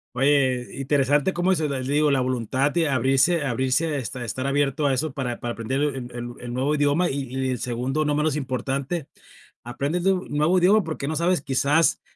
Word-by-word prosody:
Oye, 130 Hz, -2 st, +2 dB
interesante 145 Hz, +4 st, +2 dB
cómo 175 Hz, +2 st, +1 dB
eso 160 Hz, -5 st, +1 dB
del 135 Hz, -3 st, -3 dB
digo, 145 Hz, +2 st, +2 dB
la 135 Hz, -2 st, +2 dB
voluntad 130 Hz, +2 st, 0 dB
de 165 Hz, -1 st, +1 dB
abrirse 135 Hz, +6 st, +2 dB
abrirse, 130 Hz, +5 st, 0 dB
este, 125 Hz, -1 st, -5 dB
estar 130 Hz, +4 st, -3 dB
abierto 145 Hz, +1 st, +1 dB
a 135 Hz, -, +2 dB
eso 140 Hz, +2 st, -2 dB
para 125 Hz, -4 st, -3 dB
para 120 Hz, 0 st, -3 dB
aprender 130 Hz, +5 st, -2 dB
el 145 Hz, -2 st, 0 dB, 0.2 s
el 120 Hz, 0 st, -6 dB
el 120 Hz, 0 st, -7 dB
nuevo 135 Hz, +4 st, 0 dB
idioma 145 Hz, +4 st, +2 dB
y 140 Hz, +1 st, -2 dB
y 130 Hz, 0 st, -1 dB
en 125 Hz, -, -2 dB
segundo 125 Hz, +6 st, -2 dB
no 150 Hz, 0 st, +1 dB
menos 150 Hz, 0 st, +1 dB
importante, 135 Hz, +3 st, -3 dB, 0.6 s
aprendes 140 Hz, +8 st, -2 dB
de 195 Hz, -, +5 dB
un 185 Hz, 0 st, -4 dB
nuevo 150 Hz, +5 st, +2 dB
idioma 200 Hz, +4 st, +4 dB
porque 155 Hz, -4 st, -5 dB
no 155 Hz, -, -2 dB
sabes 175 Hz, -1 st, +1 dB
quizás, 140 Hz, +4 st, +2 dB
140 Hz, 195 wpm, -24 LUFS, 130-155 Hz, 0.6 s, de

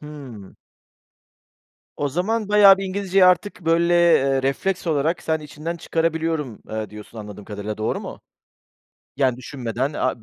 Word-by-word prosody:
Hımm. 135 Hz, -10 st, -10 dB, 1.4 s
O 145 Hz, -, -1 dB
zaman 200 Hz, +8 st, -1 dB
bayağı 205 Hz, -2 st, +7 dB
bir 195 Hz, -, -3 dB
İngilizceyi 195 Hz, 0 st, +2 dB
artık, 180 Hz, +2 st, +2 dB
böyle, 170 Hz, +1 st, +3 dB, 0.2 s
eee, 135 Hz, 0 st, +2 dB
refleks 175 Hz, +8 st, -1 dB
olarak 160 Hz, +2 st, 0 dB
sen 160 Hz, -1 st, -1 dB
içinden 155 Hz, +3 st, -6 dB
çıkarabiliyorum, 160 Hz, -6 st, -2 dB
eee, 110 Hz, -2 st, -4 dB
diyorsun 105 Hz, +2 st, -11 dB
anladığım 105 Hz, -1 st, -9 dB
kadarıyla, 105 Hz, +1 st, -6 dB
doğru 110 Hz, -, -1 dB
mu? -, -, -8 dB, 1.0 s
Yani, 130 Hz, -3 st, +2 dB
düşünmeden 130 Hz, +1 st, -4 dB
a 130 Hz, -5 st, -2 dB
150 Hz, 135 wpm, -22 LUFS, 120-175 Hz, 1.4 s, bayağı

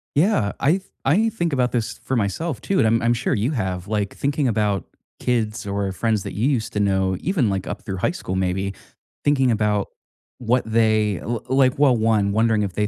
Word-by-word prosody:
Yeah. 150 Hz, -, +2 dB
I 140 Hz, -, +3 dB
th 185 Hz, +2 st, 0 dB, 0.2 s
I 205 Hz, +12 st, +3 dB
think 170 Hz, -8 st, -2 dB
about 125 Hz, -2 st, +1 dB
this 115 Hz, -1 st, -2 dB
for 130 Hz, -, -1 dB
myself 120 Hz, -, -2 dB
too, 195 Hz, -, -1 dB
and 110 Hz, -, +4 dB
I'm 115 Hz, +1 st, +2 dB
I'm 120 Hz, 0 st, +3 dB
sure 120 Hz, +2 st, -1 dB
you 110 Hz, +7 st, 0 dB
have, 95 Hz, -, -3 dB
like, 105 Hz, -2 st, -2 dB
thinking 140 Hz, 0 st, 0 dB
about 105 Hz, -5 st, 0 dB, 0.3 s
kids 110 Hz, -4 st, -1 dB
or 100 Hz, -1 st, -1 dB
friends 110 Hz, +1 st, 0 dB
that -, -, -6 dB
you 110 Hz, +7 st, 0 dB
used 120 Hz, -6 st, -1 dB
to 105 Hz, -, -1 dB
know, 95 Hz, -2 st, +1 dB
even, 165 Hz, -, +1 dB
like, 95 Hz, -1 st, -2 dB
up -, -, -5 dB
through 95 Hz, -2 st, -4 dB
high 95 Hz, -, +1 dB
school 95 Hz, -, -5 dB
maybe, 95 Hz, +1 st, -1 dB, 0.5 s
thinking 135 Hz, -3 st, +3 dB
about 105 Hz, -2 st, +1 dB, 0.5 s
what 125 Hz, +1 st, +1 dB
they 110 Hz, -3 st, +2 dB
l 120 Hz, -1 st, -3 dB
like, 130 Hz, -1 st, +3 dB
well, 140 Hz, -4 st, +5 dB
1, 110 Hz, -3 st, +2 dB
wondering 110 Hz, 0 st, +2 dB
if 100 Hz, -3 st, -3 dB
they 105 Hz, +3 st, 0 dB
110 Hz, 210 wpm, -22 LUFS, 100-130 Hz, 0.5 s, well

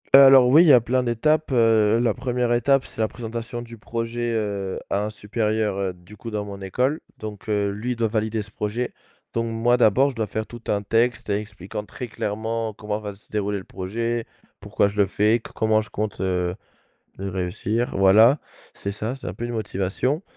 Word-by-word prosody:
Heu, 135 Hz, -, +11 dB
alors 135 Hz, -2 st, +8 dB
oui, 145 Hz, +6 st, +7 dB
il 175 Hz, -, +3 dB
y 145 Hz, -, +8 dB
a 125 Hz, -, +8 dB
plein 125 Hz, +3 st, +1 dB
d'étapes, 150 Hz, +7 st, +1 dB
heu, 115 Hz, -2 st, +4 dB
la 120 Hz, -, +2 dB
1re 125 Hz, -1 st, 0 dB
étape 135 Hz, +2 st, +3 dB
c'est 110 Hz, -, -6 dB
la 110 Hz, -, +3 dB
présentation 115 Hz, +1 st, -6 dB
du 115 Hz, -1 st, -11 dB
projet, 115 Hz, +2 st, -3 dB
heu, 100 Hz, -4 st, -2 dB
à 100 Hz, +1 st, +1 dB
un -, -, -2 dB
supérieur, 110 Hz, -1 st, -1 dB
heu, 95 Hz, -2 st, -1 dB
du 90 Hz, +4 st, -16 dB
coup 115 Hz, -, -7 dB
dans 105 Hz, -2 st, -3 dB
mon 100 Hz, -1 st, -8 dB
école, 125 Hz, -, 0 dB, 0.2 s
donc 110 Hz, 0 st, -8 dB
heu, 100 Hz, -1 st, +1 dB
lui 110 Hz, +5 st, -3 dB
il -, -, -1 dB
doit 115 Hz, -1 st, 0 dB
valider 110 Hz, 0 st, -1 dB
ce 105 Hz, -, -17 dB
projet. 110 Hz, +4 st, -3 dB, 0.4 s
Donc, 115 Hz, 0 st, 0 dB
moi 115 Hz, +2 st, +2 dB
d'abord 125 Hz, +5 st, +4 dB
je -, -, -14 dB
dois 110 Hz, -2 st, -1 dB
faire 110 Hz, +2 st, -3 dB
tout 120 Hz, -1 st, -11 dB
un 100 Hz, 0 st, 0 dB
texte, 115 Hz, +2 st, +1 dB
expliquant 100 Hz, -1 st, -4 dB
très 125 Hz, -, -7 dB
clairement 110 Hz, +1 st, -3 dB
comment 105 Hz, 0 st, -3 dB
va 105 Hz, -2 st, -6 dB
se 100 Hz, -, -25 dB
dérouler 105 Hz, -1 st, -1 dB
le 95 Hz, -, -7 dB
projet, 115 Hz, +5 st, -3 dB, 0.3 s
pourquoi 100 Hz, 0 st, +1 dB
je 100 Hz, +1 st, -7 dB
le 100 Hz, -2 st, +4 dB
fais, 105 Hz, +4 st, +2 dB
co -, -, -12 dB
comment 110 Hz, -1 st, +2 dB
je 110 Hz, -, -11 dB
compte 105 Hz, -1 st, -3 dB, 1.0 s
réussir 95 Hz, +5 st, -2 dB
voilà, 110 Hz, +8 st, +6 dB, 0.4 s
c'est 100 Hz, -, -4 dB
ça, 110 Hz, +4 st, -4 dB
c'est 135 Hz, -, -9 dB
un 90 Hz, -, -4 dB
peu 120 Hz, -, -5 dB
une 120 Hz, -, -3 dB
motivation. 110 Hz, -, -1 dB
110 Hz, 205 wpm, -23 LUFS, 105-120 Hz, 1.0 s, Heu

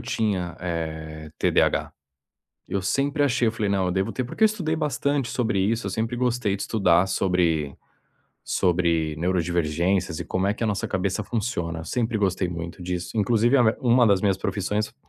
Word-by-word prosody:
tinha, 95 Hz, -6 st, -2 dB
eh, 80 Hz, -2 st, -5 dB
TDAH. -, -, +2 dB, 0.7 s
Eu 95 Hz, 0 st, -2 dB
sempre 140 Hz, +8 st, 0 dB
achei, 130 Hz, -4 st, +2 dB
eu -, -, -1 dB
falei: 110 Hz, -3 st, -2 dB
"Não, 95 Hz, -2 st, +1 dB
eu 90 Hz, -, 0 dB
devo 95 Hz, +1 st, -1 dB
ter", 130 Hz, -, -2 dB
porque 125 Hz, -, -5 dB
eu -, -, +9 dB
estudei 180 Hz, -7 st, -1 dB
bastante 145 Hz, -3 st, 0 dB
sobre 115 Hz, -4 st, 0 dB
isso, 110 Hz, +3 st, 0 dB
eu -, -, -2 dB
sempre 115 Hz, +4 st, -2 dB
gostei 120 Hz, -4 st, 0 dB
de 100 Hz, -, -5 dB
estudar 95 Hz, -5 st, +3 dB
sobre 85 Hz, -6 st, +1 dB, 0.7 s
sobre 85 Hz, -3 st, +1 dB
neurodivergências 85 Hz, 0 st, 0 dB
e -, -, -3 dB
como 95 Hz, +1 st, -1 dB
é 100 Hz, -, +1 dB
que -, -, -7 dB
a -, -, +2 dB
nossa 105 Hz, -1 st, -1 dB
cabeça 95 Hz, +2 st, -1 dB
funciona, 85 Hz, -8 st, -3 dB
eu -, -, -8 dB
sempre 115 Hz, +5 st, -1 dB
gostei 95 Hz, -3 st, 0 dB
muito 85 Hz, 0 st, -6 dB
disso. 90 Hz, +2 st, -4 dB
Inclusive 115 Hz, +4 st, +3 dB
a 125 Hz, -, +5 dB
me 110 Hz, -1 st, +3 dB
uma 120 Hz, -2 st, +4 dB
das 100 Hz, -3 st, +4 dB
minhas 100 Hz, -2 st, +2 dB
profissões, 105 Hz, +3 st, -2 dB
100 Hz, 185 wpm, -24 LUFS, 85-115 Hz, 0.7 s, eu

